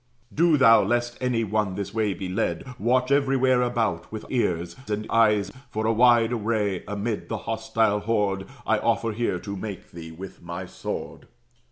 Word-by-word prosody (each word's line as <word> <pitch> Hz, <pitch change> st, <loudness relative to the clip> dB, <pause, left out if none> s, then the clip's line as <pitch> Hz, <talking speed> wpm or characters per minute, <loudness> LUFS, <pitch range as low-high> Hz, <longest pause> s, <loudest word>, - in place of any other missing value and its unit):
Do 165 Hz, -1 st, +4 dB
thou, 115 Hz, -5 st, +7 dB
lest 120 Hz, +3 st, 0 dB
any 125 Hz, -3 st, +1 dB
one 105 Hz, -2 st, -1 dB
this 100 Hz, +1 st, -5 dB
way 110 Hz, -3 st, 0 dB
be 95 Hz, -, -5 dB
led, 95 Hz, +5 st, -1 dB, 0.2 s
Watch 125 Hz, +4 st, +2 dB
everywhere 135 Hz, -2 st, +3 dB
about, 115 Hz, -8 st, -1 dB
with 110 Hz, -1 st, -6 dB
ears 85 Hz, -9 st, 0 dB
and 105 Hz, 0 st, -2 dB
eyes; 105 Hz, -3 st, +3 dB, 0.2 s
For 110 Hz, -2 st, -2 dB
a 115 Hz, -, +3 dB
wide 120 Hz, 0 st, +5 dB
way, 105 Hz, -4 st, -1 dB
amid 105 Hz, +2 st, -3 dB
the 110 Hz, -, -2 dB
hostile 110 Hz, -1 st, 0 dB
horde, 105 Hz, -3 st, 0 dB, 0.2 s
I -, -, +2 dB
offer 115 Hz, -, +1 dB
here 110 Hz, -3 st, -1 dB
to 100 Hz, -1 st, -5 dB
make 100 Hz, -1 st, -7 dB
thee 85 Hz, -1 st, -9 dB
with 95 Hz, +4 st, -10 dB
my 85 Hz, +2 st, -6 dB
sword." -, -, -6 dB
110 Hz, 170 wpm, -25 LUFS, 100-120 Hz, 0.2 s, thou